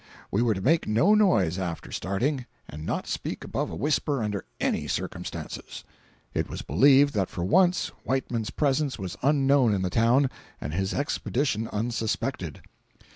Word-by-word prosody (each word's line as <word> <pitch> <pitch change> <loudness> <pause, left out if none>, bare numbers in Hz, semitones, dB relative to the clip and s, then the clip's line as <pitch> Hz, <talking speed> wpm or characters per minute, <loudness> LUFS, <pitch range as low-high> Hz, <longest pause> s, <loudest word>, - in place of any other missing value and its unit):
We 100 - +2
were 115 -3 +2
to 95 - -4
make 160 - +2
no 115 - +4
noise 105 - +3
after 85 -3 -4
starting, 125 +7 -1 0.2
and 75 +2 -8
not - - -2
speak - - -4
above - - -2
a - - -6
whisper 145 - 0
under 105 -2 -3
any - - 0
circumstances. - - -5 0.5
It - - -1
was - - -5
believed 135 - +5
that 100 -4 0
for 85 - -4
once 180 - +3
Whiteman's 125 -4 -1
presence 140 -3 0
was 90 -3 -5
unknown 135 -5 +4
in 95 - -1
the 90 - -1
town 125 +5 +3 0.3
and 75 - -5
his 95 +2 -1
expedition 135 -4 -1
unsuspected. 110 0 -2
115 Hz, 155 wpm, -27 LUFS, 95-140 Hz, 0.5 s, believed